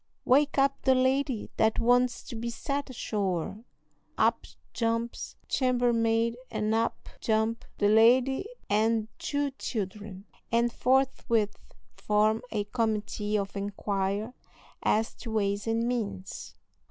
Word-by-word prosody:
wake 285 +3 +3
up 275 0 +2
the 265 -1 +4
lady 260 -2 +1
that 220 0 +3
wants 245 +1 +3
to 245 - -8
be 230 +1 -3
set 280 +4 -3
ashore." 200 -4 -2 0.5
Up - - +2 0.3
jumps 230 0 -2
chambermaid, 235 -3 +2
and 215 0 -1
up 225 +1 -1
jump 220 +1 0
the 205 - +3
lady 245 - +4 0.2
and 220 +1 +2
two 285 -1 -1
children, 200 -2 -5 0.3
and 235 0 +2
forthwith 250 -5 +1 0.4
form 215 +1 +2
a 210 -3 -1
committee 210 -1 -1
of 200 -1 -3
inquiry 200 +2 -2 0.5
as 220 +1 +1
to 235 - -9
ways 200 0 0
and 225 +1 +1
means. 205 -6 -4
225 Hz, 115 wpm, -28 LUFS, 210-245 Hz, 0.5 s, the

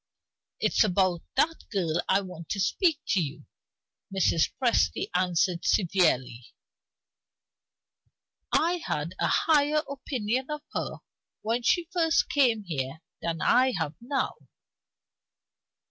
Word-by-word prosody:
"It's - - +3
about 185 -4 +1
that 325 +1 +1
girl 175 -5 0
I 195 - +4
want 180 -4 -10
to 200 - -2
speak 320 - +2
to 195 - +3
you," 150 -1 -5 0.7
Mrs. 185 -4 +2
Presty 230 - +1
answered, 180 -1 +1
severely. 160 - +1 2.1
"I 345 +3 +2
had 150 +4 -3
a - - +2
higher 300 -1 +3
opinion 260 -2 -3
of 300 0 -4
her - - -4 0.4
when 230 +3 0
she 345 +8 +2
first 330 -2 +2
came 240 -7 +3
here 150 -3 -4 0.2
than 165 -2 -2
I 255 +1 +4
have 160 -2 -2
now." 270 +3 -1
195 Hz, 115 wpm, -27 LUFS, 170-275 Hz, 2.1 s, I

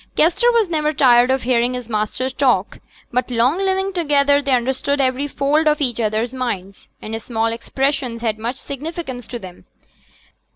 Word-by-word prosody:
Kester 355 +10 +3
was 460 -4 +2
never 305 -2 0
tired 250 -3 +5
of 265 0 +1
hearing 245 0 +1
his 250 -2 -6
master 215 +3 -2
talk; 255 -8 +1 0.3
by 250 - +3
long 250 +8 +2
living 385 0 0
together 285 -4 +3
they 280 -1 -2
understood 265 +3 0
every 265 +1 +1
fold 295 +3 +1
of 300 0 +3
each 245 -5 -1
other's 220 +2 -1
minds, 200 -7 -5
and 225 +1 -5
small 225 0 -1
expressions 255 -1 -2
had 220 -2 -1
much 235 +4 -3
significance 280 -4 -6
to 240 - -5
them. 185 -5 -12
255 Hz, 165 wpm, -20 LUFS, 235-290 Hz, 0.3 s, tired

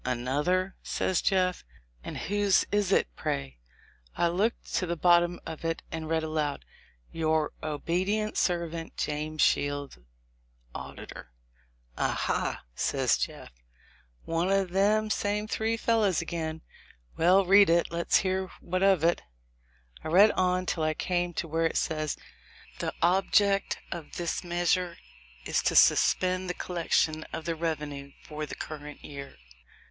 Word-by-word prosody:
"Another?" 145 +10 0
says 185 - -1
Jeff; 185 -2 +1 0.4
"and - - -6
whose 205 -1 +2
egg - - -14
is 205 -2 +1
it, - - +3
pray?" 65 -3 -3 0.6
I 170 - +3
looked 205 +7 -1
to 185 - -1
the 170 - -1
bottom 175 +1 +3
of 160 - -7
it, 165 0 -2
and 160 -1 -5
read 160 -1 +1
aloud, 155 -2 -2 0.5
"Your 160 -1 0
obedient 185 +8 -1
servant, 170 -2 -1
James 155 +1 -1
Shields, 145 - 0 0.7
Auditor." 60 - -9 0.7
"Aha - - -1
!" - - -39
says - - +1
Jeff, - - -4 0.7
"one 165 +3 0
of 195 -2 +1
them 210 +3 +2
same 210 +1 -1
three 225 +1 -1
fel 230 0 +2
lows 195 -6 +2
again. 160 -1 -4 0.5
Well, 185 +4 +4
read 195 0 +7
it, 170 0 +4
and - - -24
let's 170 0 +2
hear 190 0 -1
what 185 +1 -2
of 195 -5 +4
it." 170 +1 +3 0.8
I - - -5
read 195 +7 +6
on 185 0 +1
till 170 - -2
I 155 0 +1
came 175 +1 -1
to 170 - -2
where 165 +1 +1
it - - -3
says, 155 -2 -1 0.6
"The - - -1
object 195 +2 +3
of 170 -4 -7
this 175 +1 -2
measure 175 0 0 0.5
is - - +1
to - - 0
suspend 185 0 +4
the 180 - -2
collection 160 -2 0
of 160 - -5
the 165 - 0
revenue 150 -4 -4
for 150 0 -6
the - - -7
current 150 -1 -8
year." 140 - -8
170 Hz, 145 wpm, -28 LUFS, 155-185 Hz, 0.8 s, read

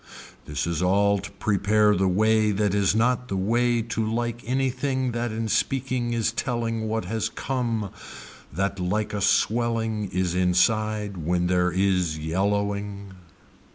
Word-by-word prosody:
This 75 -2 -3
is 85 -1 -2
all 100 +2 +3
to - - -7
prepare 105 +1 +2
the 95 +1 +2
way 110 +3 +3
that 105 -1 0
is 100 -1 +2
not 125 +2 +1
the 95 - -2
way 120 +4 +1
to 115 0 -2
like 120 +2 -2
anything 130 0 0
that 120 0 -2
in 110 +1 -3
speaking 125 +1 0
is 115 -2 0
telling 115 -1 -2
what 110 -3 -2
has 110 +3 -2
come 115 -7 -2 0.6
that 100 +4 -2
like 105 +4 -1
a 105 - -2
swelling 110 -1 +1
is 90 -2 0
inside 105 +3 +1
when 90 +2 0
there 90 0 +2
is 90 -3 +1
yellowing. 100 +4 -2
105 Hz, 145 wpm, -25 LUFS, 95-115 Hz, 0.6 s, all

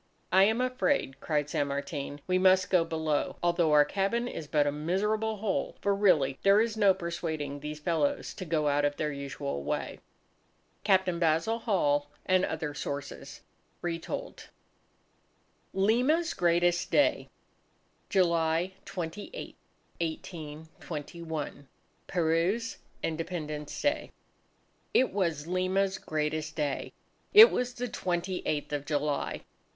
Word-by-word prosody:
"I 190 +2 +7
am 220 +4 +2
afraid," 255 - 0
cried 150 -2 0
San 145 -1 0
Martin, 140 0 -4
"we 185 0 +2
must 185 0 +4
go 180 -3 +5
below, 160 -2 -1
although 170 -2 +2
our 150 -1 +6
cabin 200 +8 0
is 160 -10 -6
but 150 -1 +2
a 145 - +1
miserable 210 +8 -1
hole! 205 -1 -2
For 200 - +1
really 165 -10 +3
there 200 +1 +5
is 225 0 +1
no 200 -3 +4
persuading 160 -5 -4
these 150 +1 -6
fellows 155 -2 0
to - - -7
go 155 -2 0
out 145 0 +2
of 145 0 0
their 150 -1 -1
usual 140 - -4
way." - - -3 0.8
Captain 190 -4 +2
Basil 165 +7 +2
Hall 145 -10 +1 0.2
and 185 0 +3
Other 160 -4 -2
Sources 140 -1 -6 0.4
(Retold) 170 -1 -5 1.2
LIMA'S 250 - +2
GREATEST 175 0 +2
DAY 290 - +2 0.8
July 170 -1 +2
28, 185 - -6 0.5
1821, 160 -1 -6 0.4
Peru's 175 +7 0 0.3
Independence 155 -2 -4
Day 290 - 0 0.8
It 255 - +4
was 165 -7 0
Lima's 185 +2 0
greatest 155 0 -2
day. 145 -3 -2 0.4
It 440 +3 +11
was 250 0 -1
the 245 0 -3
28th 180 -7 -2
of 145 -1 -3
July. 145 -1 -1
170 Hz, 120 wpm, -29 LUFS, 150-195 Hz, 1.2 s, It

